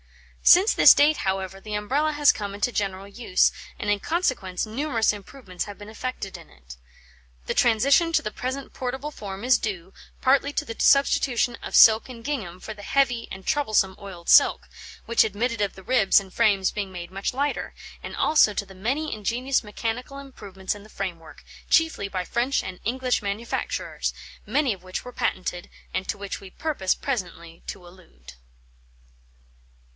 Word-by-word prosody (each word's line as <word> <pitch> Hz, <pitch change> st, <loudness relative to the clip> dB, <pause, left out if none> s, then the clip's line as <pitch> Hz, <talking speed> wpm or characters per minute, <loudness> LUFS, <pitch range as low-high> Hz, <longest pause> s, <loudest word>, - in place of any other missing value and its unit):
Since 390 Hz, +5 st, +6 dB
this -, -, +8 dB
date, 295 Hz, +2 st, +4 dB
however, 190 Hz, 0 st, -3 dB
the 210 Hz, 0 st, -5 dB
Umbrella 275 Hz, +9 st, 0 dB
has 295 Hz, -1 st, +5 dB
come 200 Hz, -1 st, -5 dB
into 205 Hz, +4 st, 0 dB
general 195 Hz, -3 st, -3 dB
use, 200 Hz, -2 st, +2 dB, 0.3 s
and 205 Hz, -, -1 dB
in 205 Hz, -, +1 dB
consequence 250 Hz, -, -1 dB
numerous 230 Hz, -1 st, 0 dB
improvements 200 Hz, -2 st, -7 dB
have 205 Hz, -1 st, -9 dB
been 205 Hz, -, -11 dB
effected 220 Hz, -4 st, -5 dB
in 170 Hz, -2 st, -12 dB
it. -, -, -14 dB, 0.7 s
The -, -, -1 dB
transition 270 Hz, +9 st, +3 dB
to -, -, +3 dB
the 215 Hz, -, -3 dB
present 260 Hz, +4 st, -5 dB
portable 265 Hz, +3 st, -4 dB
form 200 Hz, -5 st, -8 dB
is 250 Hz, -1 st, +4 dB
due, 190 Hz, -4 st, -5 dB, 0.3 s
partly 275 Hz, +2 st, +3 dB
to 300 Hz, -, -1 dB
the 230 Hz, -, -6 dB
substitution 250 Hz, -3 st, +3 dB
of -, -, -5 dB
silk 220 Hz, +3 st, +7 dB
and 235 Hz, -2 st, -10 dB
gingham 210 Hz, -12 st, -4 dB
for 220 Hz, -, -7 dB
the 205 Hz, -, -12 dB
heavy 245 Hz, 0 st, +1 dB
and 190 Hz, 0 st, -8 dB
troublesome 215 Hz, -9 st, +1 dB
oiled 180 Hz, -4 st, -10 dB
silk, -, -, +5 dB, 0.4 s
which 235 Hz, -, +4 dB
admitted 225 Hz, +2 st, -2 dB
of 200 Hz, -2 st, -1 dB
the 190 Hz, -, -12 dB
ribs 215 Hz, -4 st, +4 dB
and 190 Hz, -2 st, -12 dB
frames 205 Hz, -5 st, +2 dB
being 200 Hz, -2 st, -4 dB
made 175 Hz, -1 st, -8 dB
much 195 Hz, +1 st, -2 dB
lighter, 285 Hz, +3 st, -2 dB, 0.3 s
and -, -, -7 dB
also 260 Hz, -9 st, +4 dB
to 200 Hz, -, -2 dB
the 195 Hz, -, -14 dB
many 265 Hz, +11 st, -2 dB
ingenious 245 Hz, +6 st, -1 dB
mechanical 230 Hz, +5 st, -4 dB
improvements 200 Hz, -9 st, -6 dB
in 205 Hz, -, -11 dB
the 215 Hz, -, -16 dB
framework, 175 Hz, -6 st, -7 dB, 0.3 s
chiefly 320 Hz, -11 st, +2 dB
by 185 Hz, -2 st, -4 dB
French 245 Hz, +7 st, 0 dB
and 185 Hz, -1 st, -7 dB
English 250 Hz, +2 st, 0 dB
manufacturers, 205 Hz, +3 st, -3 dB, 0.3 s
many 265 Hz, +2 st, +1 dB
of 190 Hz, -, -13 dB
which 185 Hz, +4 st, -6 dB
were 250 Hz, -, -9 dB
patented, 180 Hz, -4 st, -3 dB, 0.2 s
and 185 Hz, 0 st, -3 dB
to 205 Hz, -, -1 dB
which 200 Hz, -1 st, -6 dB
we 195 Hz, -, -11 dB
purpose 235 Hz, -6 st, -1 dB
presently 175 Hz, -10 st, -5 dB
to 175 Hz, -, -7 dB
allude. 175 Hz, -, -16 dB
215 Hz, 170 wpm, -25 LUFS, 190-260 Hz, 0.7 s, this